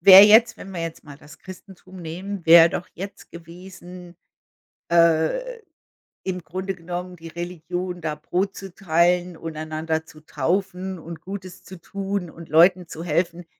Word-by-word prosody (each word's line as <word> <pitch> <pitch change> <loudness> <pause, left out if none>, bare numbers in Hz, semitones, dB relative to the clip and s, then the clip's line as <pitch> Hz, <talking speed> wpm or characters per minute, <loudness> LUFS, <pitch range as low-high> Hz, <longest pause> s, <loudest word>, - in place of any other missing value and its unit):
wäre 190 +2 +11
jetzt, 220 +3 +6
wenn 195 - -10
wir 180 -3 -5
jetzt 165 -1 -5
mal 145 -2 -12
das 150 +1 -16
Christentum 185 0 -13
nehmen 180 +3 -6
wäre 165 0 +8
doch 175 - -4
jetzt 195 +3 -9
gewesen, 175 +1 -12 0.8
äh, 170 - +2 0.7
im 180 -2 -4
Grunde 185 +4 -4
genommen 180 +1 -6
die 165 -1 -11
Religion, 175 +1 -5
da 155 -1 -3
Brot 180 +6 -2
zu 195 -2 -9
teilen 175 0 +1
und 165 -1 -7
einander 155 +1 -3
zu 155 - -15
taufen 180 +5 -2
und 165 0 -9
Gutes 190 -1 -8
zu 185 - -11
tun 195 0 -4
und 165 0 -12
Leuten 175 +3 +5
zu 165 0 -8
helfen. 170 +1 -1
175 Hz, 155 wpm, -23 LUFS, 165-190 Hz, 0.8 s, wäre